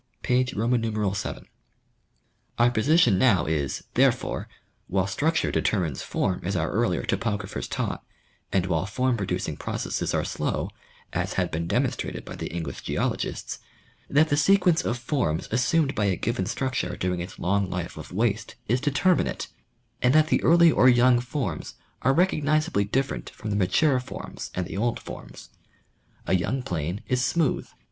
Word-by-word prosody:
(p. 125 Hz, 0 st, +3 dB
vii.) 115 Hz, -4 st, 0 dB, 1.4 s
Our 120 Hz, +1 st, +4 dB
position 120 Hz, -, +4 dB
now 115 Hz, -8 st, +4 dB
is, 75 Hz, -4 st, -1 dB
therefore, -, -, +1 dB, 0.4 s
while 95 Hz, 0 st, +1 dB
structure 150 Hz, -, 0 dB
determines 85 Hz, -, 0 dB
form 90 Hz, -2 st, -1 dB
as 95 Hz, +3 st, -2 dB
our 80 Hz, -2 st, 0 dB
earlier 110 Hz, -5 st, +1 dB
topographers 100 Hz, 0 st, -2 dB
taught, -, -, -3 dB, 0.5 s
and 95 Hz, -2 st, +2 dB
while 90 Hz, 0 st, 0 dB
form 125 Hz, +4 st, +1 dB
producing 100 Hz, -4 st, -2 dB
processes -, -, -2 dB
are -, -, 0 dB
slow, -, -, -2 dB, 0.4 s
as -, -, -1 dB
had -, -, 0 dB
been 85 Hz, +1 st, -2 dB
demonstrated -, -, -1 dB
by -, -, -7 dB
the -, -, -5 dB
English 85 Hz, -1 st, -5 dB
geologists, -, -, -2 dB, 0.5 s
that 155 Hz, +3 st, +4 dB
the 145 Hz, -, +2 dB
sequence 180 Hz, +1 st, +4 dB
of 120 Hz, -, -1 dB
forms 120 Hz, -, -1 dB
assumed 135 Hz, +5 st, +2 dB
by 105 Hz, -, 0 dB
a 95 Hz, -2 st, +2 dB
given 105 Hz, 0 st, -1 dB
struct 130 Hz, +6 st, -1 dB
iire 90 Hz, -, -4 dB
during 90 Hz, -1 st, -1 dB
its 90 Hz, +2 st, -6 dB
long 100 Hz, +1 st, 0 dB
life 90 Hz, -1 st, -4 dB
of -, -, -9 dB
waste 110 Hz, +2 st, -1 dB
is 125 Hz, +3 st, +1 dB
determinate, 150 Hz, +6 st, +1 dB, 0.5 s
and 125 Hz, +4 st, +4 dB
that 155 Hz, 0 st, +5 dB
the -, -, +3 dB
early 170 Hz, 0 st, +6 dB
or 130 Hz, -, +5 dB
young 120 Hz, 0 st, +5 dB
forms 120 Hz, -, -4 dB, 0.3 s
are 135 Hz, -, +3 dB
recognizably 155 Hz, -, +2 dB
different 135 Hz, +6 st, -1 dB
from 105 Hz, -, -6 dB
the -, -, 0 dB
mature 130 Hz, -, +3 dB
forms 125 Hz, -, -7 dB
and 90 Hz, -, -1 dB
the -, -, -7 dB
old 115 Hz, +3 st, 0 dB
forms. -, -, -10 dB, 0.7 s
A -, -, -3 dB
youn^ 125 Hz, +8 st, 0 dB
plain 85 Hz, +3 st, -3 dB
is 125 Hz, -1 st, +1 dB
smooth. 160 Hz, -1 st, +1 dB
115 Hz, 155 wpm, -26 LUFS, 95-135 Hz, 1.4 s, early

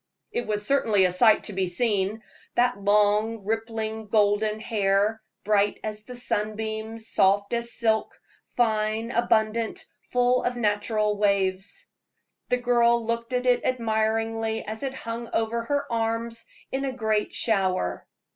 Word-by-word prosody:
It 240 Hz, -, -3 dB
was 210 Hz, -1 st, -1 dB
certainly 220 Hz, -7 st, +3 dB
a 180 Hz, -, +2 dB
sight 220 Hz, +5 st, +5 dB
to 210 Hz, -, -2 dB
be 190 Hz, -1 st, 0 dB
seen, 205 Hz, +2 st, 0 dB, 0.3 s
that 245 Hz, -4 st, +1 dB
long, 210 Hz, +2 st, +2 dB
rippling 220 Hz, 0 st, -3 dB
golden 210 Hz, 0 st, +2 dB
hair, 205 Hz, 0 st, +1 dB, 0.2 s
bright 205 Hz, -1 st, +2 dB
as 215 Hz, 0 st, -5 dB
the 250 Hz, -, -8 dB
sunbeams, 220 Hz, -1 st, -3 dB
soft 200 Hz, +3 st, +2 dB
as 235 Hz, 0 st, 0 dB
silk, 220 Hz, -2 st, 0 dB, 0.4 s
fine, 220 Hz, -1 st, +1 dB
abundant, 225 Hz, -1 st, 0 dB, 0.3 s
full 250 Hz, 0 st, +3 dB
of 245 Hz, 0 st, -1 dB
natural 210 Hz, -1 st, 0 dB
waves. 195 Hz, -1 st, 0 dB, 0.6 s
The 250 Hz, -, +3 dB
girl 235 Hz, -1 st, +3 dB
looked 230 Hz, +1 st, -2 dB
at 250 Hz, 0 st, -1 dB
it 250 Hz, -1 st, +3 dB
admiringly 225 Hz, -2 st, 0 dB
as 220 Hz, +1 st, -5 dB
it 270 Hz, -1 st, -3 dB
hung 230 Hz, -1 st, -6 dB
over 225 Hz, +1 st, 0 dB
her 285 Hz, +2 st, 0 dB
arms 230 Hz, 0 st, -2 dB, 0.2 s
in 270 Hz, +1 st, -2 dB
a 270 Hz, -1 st, -2 dB
great 220 Hz, -4 st, 0 dB
shower. 190 Hz, -, 0 dB
220 Hz, 135 wpm, -25 LUFS, 210-235 Hz, 0.6 s, sight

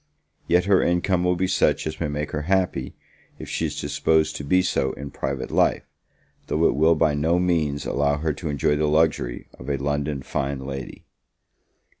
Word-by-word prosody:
Yet 90 Hz, +1 st, +3 dB
her 100 Hz, -2 st, +4 dB
income 90 Hz, +1 st, +1 dB
will 90 Hz, 0 st, +2 dB
be 90 Hz, +2 st, 0 dB
such 95 Hz, 0 st, +1 dB
as 80 Hz, 0 st, -4 dB
may 85 Hz, -, 0 dB
make 75 Hz, +1 st, -3 dB
her 75 Hz, -, -2 dB
happy, 95 Hz, -2 st, 0 dB, 0.4 s
if -, -, -9 dB
she -, -, -1 dB
is -, -, -6 dB
disposed 75 Hz, +2 st, +1 dB
to -, -, -6 dB
be 90 Hz, +6 st, +3 dB
so 65 Hz, -7 st, 0 dB
in 70 Hz, +1 st, -8 dB
private 65 Hz, -1 st, -4 dB
life; -, -, +2 dB, 0.6 s
though 80 Hz, +2 st, +1 dB
it -, -, +4 dB
will 80 Hz, +4 st, +4 dB
by 80 Hz, -1 st, +2 dB
no 80 Hz, +4 st, +1 dB
means 80 Hz, -5 st, 0 dB
allow 70 Hz, 0 st, +1 dB
her 80 Hz, 0 st, -1 dB
to 80 Hz, +3 st, -5 dB
enjoy 75 Hz, 0 st, +1 dB
the 75 Hz, +1 st, +1 dB
luxury 75 Hz, -5 st, +1 dB
of 65 Hz, -, -8 dB
a 70 Hz, -, 0 dB
London 70 Hz, 0 st, -2 dB
fine 70 Hz, -1 st, -3 dB
lady. 65 Hz, -2 st, -7 dB
75 Hz, 190 wpm, -24 LUFS, 70-85 Hz, 0.6 s, her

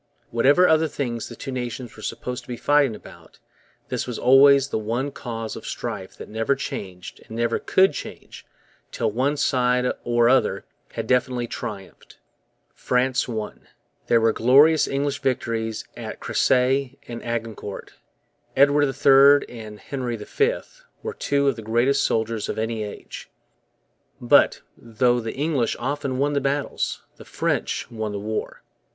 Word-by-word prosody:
Whatever 140 Hz, +10 st, +4 dB
other 160 Hz, 0 st, +3 dB
things 120 Hz, -7 st, -4 dB
the -, -, -9 dB
two 135 Hz, -, -7 dB
nations 125 Hz, -1 st, -5 dB
were 110 Hz, -, -12 dB
supposed 125 Hz, +3 st, -5 dB
to -, -, -21 dB
be 120 Hz, -1 st, -5 dB
fighting 145 Hz, -5 st, +3 dB
about, -, -, -15 dB, 0.5 s
this -, -, -3 dB
was 125 Hz, -, -4 dB
always 140 Hz, +1 st, +6 dB
the -, -, -1 dB
one 120 Hz, +6 st, -2 dB
cause 115 Hz, -4 st, -6 dB
of -, -, -9 dB
strife -, -, -5 dB
that -, -, -9 dB
never 115 Hz, +5 st, 0 dB
changed 95 Hz, -8 st, -7 dB
and 110 Hz, -, -8 dB
never 115 Hz, 0 st, 0 dB
could 190 Hz, +1 st, +3 dB
change -, -, -9 dB, 0.5 s
till -, -, -1 dB
one 135 Hz, +6 st, 0 dB
side 125 Hz, -2 st, +2 dB, 0.2 s
or 120 Hz, -1 st, +3 dB
other 130 Hz, +1 st, +2 dB, 0.3 s
had -, -, -4 dB
definitely 125 Hz, -1 st, +1 dB
triumphed. 100 Hz, -4 st, -8 dB, 0.6 s
France 130 Hz, +1 st, 0 dB
won. 110 Hz, -3 st, -6 dB, 0.4 s
There 115 Hz, -, +4 dB
were 115 Hz, 0 st, +3 dB
glorious 145 Hz, +7 st, +5 dB
English 140 Hz, +1 st, -2 dB
victories 115 Hz, -4 st, -2 dB
at -, -, -7 dB
Cressy 130 Hz, +1 st, +1 dB
and 120 Hz, -1 st, -7 dB
Agincourt. 115 Hz, -3 st, -5 dB, 0.6 s
Edward 145 Hz, +1 st, +5 dB
III 140 Hz, +1 st, +5 dB
and 110 Hz, -2 st, -9 dB
Henry 125 Hz, -4 st, -4 dB
V 430 Hz, -, 0 dB, 0.4 s
were 450 Hz, -, -4 dB
two 140 Hz, -, 0 dB
of 135 Hz, -, +2 dB
the 115 Hz, -, -8 dB
greatest 120 Hz, +5 st, +2 dB
soldiers 110 Hz, -1 st, -1 dB
of -, -, -3 dB
any 110 Hz, 0 st, -2 dB
age. 105 Hz, -, -9 dB, 0.9 s
But, -, -, +4 dB
though 120 Hz, +2 st, +1 dB
the 115 Hz, -1 st, -5 dB
English 140 Hz, -5 st, 0 dB
often 135 Hz, 0 st, -3 dB
won 145 Hz, +2 st, +1 dB
the 140 Hz, -, +1 dB
battles, 140 Hz, +1 st, -2 dB
the -, -, -12 dB
French -, -, -2 dB
won 110 Hz, -2 st, -4 dB
the 100 Hz, -, -4 dB
war. 110 Hz, +2 st, -5 dB
125 Hz, 150 wpm, -23 LUFS, 115-140 Hz, 0.9 s, always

